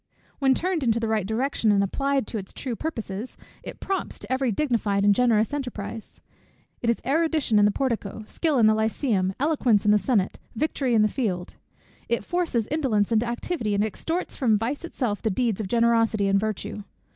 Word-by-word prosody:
When 265 -2 +4
turned 360 -2 -1
into 230 -3 +2
the 225 - -1
right 215 -3 0
direction, 225 0 +1
and 200 -1 +3
applied 275 +5 0
to 220 - -4
its 190 - -9
true 250 -3 -4
purposes, 225 -6 -5 0.2
it - - -9
prompts 390 -1 -3
to 205 - -9
every 260 -2 +1
dignified 210 -5 0
and 205 - +6
generous 225 +1 +2
enterprise. 230 -6 -5 0.6
It 235 - 0
is 235 - 0
erudition 310 -5 +2
in 205 - +5
the 205 - +4
portico, 220 -3 -2
skill 310 +4 0
in 230 - +5
the 215 - +6
lycæum, 220 -3 0
eloquence 260 -8 +2
in 210 - +5
the 210 - +5
senate, 205 -5 0 0.2
victory 265 -2 0
in 215 - +5
the - - +4
field. 195 -7 -3 0.6
It 235 - 0
forces 335 -11 0
indolence 240 -9 +1
into 230 +1 +2
activity, 235 - -2
and 200 - +2
extorts 325 - -3
from 230 -6 +2
vice 240 +9 -3
itself 245 -11 -2
the 220 - 0
deeds 220 0 0
of 205 - -4
generosity 230 -2 +2
and 195 0 +3
virtue. 215 0 -3
230 Hz, 190 wpm, -25 LUFS, 210-270 Hz, 0.6 s, and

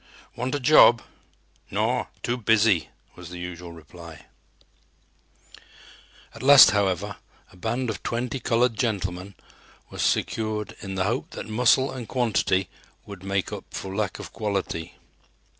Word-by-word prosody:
"Want 125 +3 -2
a - - -1
job?" 125 -4 +6 0.7
"Naw, 115 +5 0 0.2
too 120 - 0
busy," 110 -5 +2 0.3
was 90 -1 -11
the 90 - -8
usual 90 -1 -7
reply. 85 -1 -13 2.1
At - - -11
last, 135 -2 +9
however, 100 -1 -1 0.3
a - - -18
band 115 +7 -2
of 105 - -7
twenty 125 +3 -3
"colored 120 0 +1
gentlemen" 100 -4 -3 0.6
was - - -5
secured 110 -1 -1
in 95 -1 -6
the 95 - 0
hope 115 +6 -2
that - - -6
muscle 125 +4 +3
and 125 -4 -7
quantity 105 -6 0 0.4
would 100 -3 -10
make 95 -1 -2
up - - -7
for 95 0 -6
lack 105 -2 -2
of - - -10
quality. 100 -6 -3
105 Hz, 135 wpm, -25 LUFS, 95-120 Hz, 2.1 s, last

